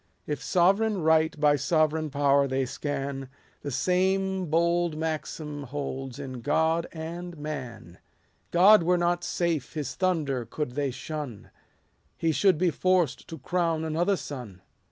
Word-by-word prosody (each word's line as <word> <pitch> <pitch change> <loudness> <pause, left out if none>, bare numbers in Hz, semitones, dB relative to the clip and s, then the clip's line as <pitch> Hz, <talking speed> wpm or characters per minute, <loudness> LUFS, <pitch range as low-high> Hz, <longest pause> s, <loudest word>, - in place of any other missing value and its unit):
If 150 -3 -3
sovereign 195 +2 +2
right 160 -1 +3
by 145 -1 +4
sovereign 155 0 +1
power 140 0 +3
they 130 0 0
scan, 135 0 -4 0.3
The 145 - -4
same 185 +6 +1
bold 170 0 +1
maxim 155 -2 -4
holds 135 -1 -5
in 130 -3 -7
God 160 +5 +1
and 170 +2 -6
man: 130 - -7 0.5
God 195 +4 +7
were 180 +2 +2
not 175 0 +1
safe, 170 -7 -1
his 145 -4 -3
thunder 155 -9 0
could 125 +4 -4
they 140 +2 -1
shun, 135 -4 -6 0.7
He 165 - +1
should 185 +2 +3
be 175 +1 +2
forced 180 -2 +1
to 165 - -7
crown 165 -3 -1
another 175 +5 +1
son. 115 - -8
155 Hz, 135 wpm, -27 LUFS, 140-175 Hz, 0.7 s, God